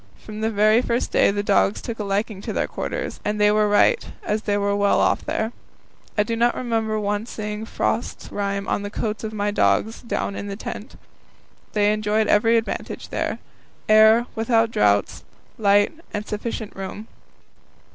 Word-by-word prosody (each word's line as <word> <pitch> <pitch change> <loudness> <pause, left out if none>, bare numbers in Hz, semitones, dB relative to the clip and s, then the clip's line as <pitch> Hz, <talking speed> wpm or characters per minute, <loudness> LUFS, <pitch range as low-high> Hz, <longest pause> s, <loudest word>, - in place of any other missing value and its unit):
From 215 0 -9
the 220 - +1
very 215 +2 +4
first 240 -1 -1
day - - +4
the 205 +1 -1
dogs 200 0 +2
took 230 -3 -6
a - - -1
liking 200 0 -2
to - - -4
their - - 0
quarters, - - -4
and 210 0 -1
they 210 0 +5
were 210 0 +3
right, 445 - +4 0.2
as 220 - -1
they 205 -2 0
were 200 0 +1
well 200 0 +3
off - - +2
there. 220 +1 -2 0.7
I 210 - +4
do 230 +2 -2
not 240 +1 +2
remember 225 -3 -1
once 205 +2 -2
seeing 210 0 -5
frost - - -2
rime 200 -1 -2
on - - 0
the 205 - -4
coats 215 +1 -3
of 220 - -3
my 205 -1 -1
dogs 220 +2 +1
down 215 -3 -3
in 200 - -5
the 200 - -4
tent. 210 - -7 0.8
They 210 0 +3
enjoyed 215 +1 +1
every 225 +3 +4
advantage 225 - -4
there - - -2 0.5
air, 220 +2 +6
without 225 0 +2
draughts, 100 - +1 0.4
light, 205 -1 +4 0.2
and 210 0 -4
sufficient 215 0 -5
room. 195 +3 -7
210 Hz, 175 wpm, -23 LUFS, 205-225 Hz, 0.8 s, air